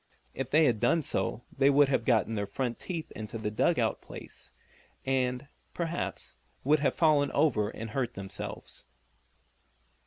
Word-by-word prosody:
If 135 -1 -4
they 155 +4 +5
had 120 -6 +2
done 150 +8 +3
so 120 - -1
they 135 0 +4
would 145 0 +6
have 135 - +1
gotten 115 -2 +2
their 100 -2 -2
front 120 +4 -3
feet 170 -4 -5
into 110 +2 -5
the 105 -1 -3
dug 105 - +2
out - - 0
place, - - -11 0.5
and, 130 0 0 0.3
perhaps, 170 0 -4 0.3
would 150 +3 +4
have 140 - +1
fallen 150 -4 +3
over 110 -9 +2
and 110 0 -7
hurt 125 -1 -2
themselves. 95 0 -7
130 Hz, 155 wpm, -30 LUFS, 115-145 Hz, 0.5 s, would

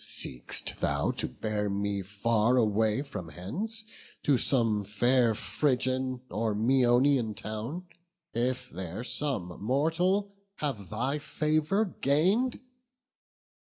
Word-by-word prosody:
Seek'st 60 -2 +1
thou 70 0 +1
to - - -2
bear 105 -1 -2
me 100 0 -1
far 110 +5 +1
away 110 +2 +2
from 90 - -7
hence 195 - -3 0.4
To 145 - +4
some 115 -5 +2
fair 120 +3 +2
Phrygian 130 -1 0
or 110 +1 -1
Maeonian 120 0 +3
town, 110 - -5 0.5
If 125 +2 -1
there 95 +5 -5
some 110 -11 -2
mortal 175 - +1 0.2
have 125 -10 -3
thy 130 +7 -1
favour 155 +7 +1
gain'd? 190 - +1
120 Hz, 105 wpm, -29 LUFS, 105-145 Hz, 0.5 s, To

